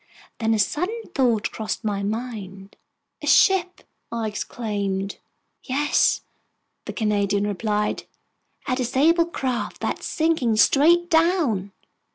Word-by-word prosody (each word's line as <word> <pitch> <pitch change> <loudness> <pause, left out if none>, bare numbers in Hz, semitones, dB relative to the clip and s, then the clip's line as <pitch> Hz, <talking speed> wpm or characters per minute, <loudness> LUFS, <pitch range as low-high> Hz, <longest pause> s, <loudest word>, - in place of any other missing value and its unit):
Then 225 -1 +2
a - - 0
sudden 360 - -1
thought 235 -5 +1
crossed 220 +1 -4
my 205 -2 -1
mind. 200 -3 -5 0.5
"A - - -6
ship!" 370 -2 +4 0.3
I 230 -1 -2
exclaimed. 200 -3 -3 0.4
"Yes," 290 +3 +1 0.6
the - - -5
Canadian 205 -2 0
replied, 210 +1 -1 0.6
"a 255 - +1
disabled 310 +7 +2
craft 255 -6 -3
that's - - -3
sinking 315 -9 +1
straight 330 +10 +4
down!" 320 - +2
230 Hz, 110 wpm, -23 LUFS, 205-305 Hz, 0.6 s, ship